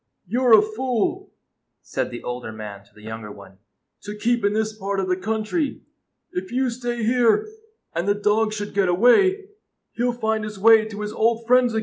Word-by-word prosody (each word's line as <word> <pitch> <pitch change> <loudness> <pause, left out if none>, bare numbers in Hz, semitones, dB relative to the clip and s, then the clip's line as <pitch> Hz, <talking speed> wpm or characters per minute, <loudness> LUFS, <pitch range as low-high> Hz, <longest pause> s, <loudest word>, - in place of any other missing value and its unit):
" - - -54
You 240 +8 -1
're 245 -3 +5
a 210 - +5
fool," 225 +1 -2 0.5
said - - -3
the 120 - -8
older 125 -2 -5
man 105 -2 -8
to - - -25
the 105 - -18
younger 110 -1 -7
one, 95 -2 -14 0.4
"to 205 0 -7
keep 240 +2 0
in 205 0 +2
this 220 0 -1
part 200 -1 -3
of 190 - -1
the 180 - +1
country. 220 - -2 0.5
If 185 +3 -5
you 255 0 0
stay 240 -1 -4
here, 240 - +3 0.5
and 170 +3 -2
the 205 - +3
dog 210 +1 +1
should 205 -1 -5
get 195 -2 +2
away, 375 - +4 0.5
he 235 - -3
'll 245 - +2
find 220 -2 -1
his 210 -1 -6
way 220 +2 +6
to 210 -1 -7
his 210 0 -4
old 230 +1 +1
friends 245 -1 +3
again." - - +2
215 Hz, 210 wpm, -23 LUFS, 190-240 Hz, 0.5 s, way